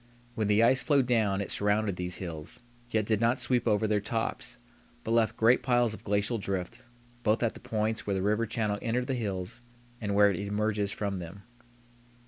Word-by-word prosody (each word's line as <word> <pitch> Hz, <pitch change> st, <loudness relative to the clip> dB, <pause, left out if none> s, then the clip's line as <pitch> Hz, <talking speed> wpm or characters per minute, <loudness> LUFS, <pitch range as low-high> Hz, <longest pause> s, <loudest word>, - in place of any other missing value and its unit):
When 110 Hz, -3 st, -1 dB
the 105 Hz, +2 st, +4 dB
ice 130 Hz, +2 st, +4 dB
flowed 140 Hz, -4 st, +3 dB
down 110 Hz, -5 st, +1 dB
it 100 Hz, -, -5 dB
surrounded 105 Hz, -1 st, +1 dB
these 90 Hz, 0 st, -3 dB
hills, 85 Hz, +6 st, -7 dB, 0.3 s
yet 110 Hz, -3 st, 0 dB
did 110 Hz, 0 st, 0 dB
not 120 Hz, +3 st, +2 dB
sweep 125 Hz, -2 st, 0 dB
over 110 Hz, 0 st, +2 dB
their 105 Hz, -1 st, +1 dB
tops, 115 Hz, +2 st, -3 dB, 0.5 s
but 110 Hz, -, -3 dB
left 115 Hz, -1 st, +2 dB
great 115 Hz, +3 st, +4 dB
piles 120 Hz, -3 st, +2 dB
of -, -, -10 dB
glacial 105 Hz, +3 st, 0 dB
drift, 95 Hz, -2 st, -4 dB, 0.4 s
both 110 Hz, 0 st, +1 dB
at 115 Hz, -, +1 dB
the -, -, -11 dB
points 110 Hz, 0 st, -2 dB
where 100 Hz, -, 0 dB
the 95 Hz, -, -1 dB
river 105 Hz, +3 st, +1 dB
channel 105 Hz, -2 st, -1 dB
entered 125 Hz, +1 st, -1 dB
the 135 Hz, -, -2 dB
hills 100 Hz, -2 st, -4 dB, 0.4 s
and 100 Hz, -2 st, -1 dB
where 100 Hz, 0 st, +6 dB
it 90 Hz, -, -3 dB
emerges 105 Hz, 0 st, -1 dB
from 100 Hz, -2 st, -3 dB
them. 90 Hz, +3 st, -8 dB
105 Hz, 195 wpm, -29 LUFS, 100-115 Hz, 0.5 s, where